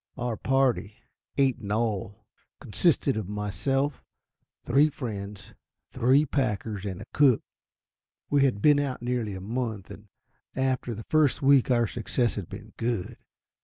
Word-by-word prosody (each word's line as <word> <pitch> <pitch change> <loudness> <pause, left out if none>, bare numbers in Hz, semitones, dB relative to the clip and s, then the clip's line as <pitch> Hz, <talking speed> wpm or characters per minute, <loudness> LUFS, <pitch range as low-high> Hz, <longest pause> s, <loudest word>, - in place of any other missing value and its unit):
Our 120 -2 -2
party, 130 -5 +1 0.4
eight 135 -3 +2
in 100 -3 -6
all, 105 -1 -2 0.3
consisted - - +1
of 105 -3 -4
myself, 135 +7 -1 0.6
three 140 +5 +4
friends, 105 -7 -7 0.4
three 135 +5 +3
packers, 110 -7 -2
and 95 +1 -5
a - - -13
cook. 135 -6 +4 0.8
We 145 -1 +3
had 120 -7 +1
been 145 -1 +6
out 135 -4 -3
nearly 120 -5 -2
a 95 - -7
month, 110 -2 -4
and 105 +1 -12 0.5
after 130 -3 -1
the 110 - -8
first 155 -3 +2
week 135 -2 +5
our 120 -2 +3
success 120 +2 -1
had 100 -5 -6
been - - -10
good. 115 -5 -2
120 Hz, 140 wpm, -27 LUFS, 105-135 Hz, 0.8 s, been